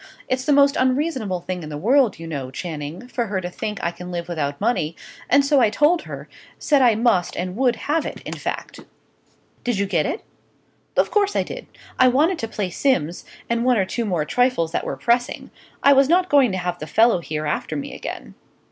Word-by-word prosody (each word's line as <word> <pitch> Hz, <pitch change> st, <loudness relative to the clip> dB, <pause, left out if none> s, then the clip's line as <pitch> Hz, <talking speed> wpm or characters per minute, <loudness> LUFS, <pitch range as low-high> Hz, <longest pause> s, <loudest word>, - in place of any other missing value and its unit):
It's 255 Hz, 0 st, -1 dB
the 300 Hz, -, +2 dB
most 280 Hz, 0 st, +5 dB
unreasonable 255 Hz, -, 0 dB
thing 180 Hz, 0 st, -4 dB
in 155 Hz, -, -7 dB
the 150 Hz, -, -5 dB
world, 240 Hz, -, +3 dB
you 165 Hz, -, -8 dB
know, 140 Hz, -5 st, -5 dB
Channing, 155 Hz, -, -6 dB
for 240 Hz, -2 st, -2 dB
her 195 Hz, -2 st, -1 dB
to 180 Hz, -1 st, -5 dB
think 210 Hz, +3 st, -4 dB
I 170 Hz, -, 0 dB
can 180 Hz, +1 st, -9 dB
live 170 Hz, -1 st, -4 dB
without 145 Hz, -5 st, -3 dB
money, 200 Hz, -8 st, 0 dB, 0.3 s
and 280 Hz, +1 st, +5 dB
so 280 Hz, 0 st, +4 dB
I 230 Hz, -4 st, +4 dB
told 300 Hz, +9 st, +3 dB
her -, -, -8 dB, 0.3 s
said 290 Hz, -3 st, +2 dB
I 240 Hz, -4 st, +5 dB
must 220 Hz, -6 st, +1 dB
and 180 Hz, +1 st, -3 dB
would 250 Hz, 0 st, +2 dB
have 300 Hz, +7 st, -1 dB
it, -, -, -6 dB
in -, -, -6 dB
fact." -, -, -5 dB, 0.8 s
"Did 245 Hz, -4 st, 0 dB
you 200 Hz, -, +1 dB
get 170 Hz, -6 st, 0 dB
it?" 435 Hz, -, -4 dB, 0.7 s
"Of -, -, +3 dB
course 410 Hz, -1 st, +2 dB
I -, -, +2 dB
did. -, -, -8 dB, 0.3 s
I 255 Hz, -, +7 dB
wanted 310 Hz, +8 st, +2 dB
to 225 Hz, -, -3 dB
pay 205 Hz, -4 st, -3 dB
Simms, 175 Hz, -, 0 dB, 0.2 s
and 235 Hz, 0 st, 0 dB
one 250 Hz, -1 st, +3 dB
or 195 Hz, -, +2 dB
two 230 Hz, +5 st, -3 dB
more 175 Hz, -7 st, 0 dB
trifles 245 Hz, -7 st, +1 dB
that -, -, -2 dB
were -, -, -4 dB
pressing; 240 Hz, +1 st, 0 dB, 0.3 s
I 280 Hz, -, +7 dB
was 275 Hz, 0 st, +4 dB
not 360 Hz, +2 st, +3 dB
going 275 Hz, -6 st, +5 dB
to 190 Hz, -, -2 dB
have 175 Hz, -1 st, -3 dB
the 155 Hz, -, -6 dB
fellow 225 Hz, -1 st, +4 dB
here 155 Hz, -2 st, -4 dB
after 150 Hz, +1 st, -2 dB
me 145 Hz, -, -5 dB
again. 65 Hz, -, -7 dB
220 Hz, 220 wpm, -22 LUFS, 175-260 Hz, 0.8 s, I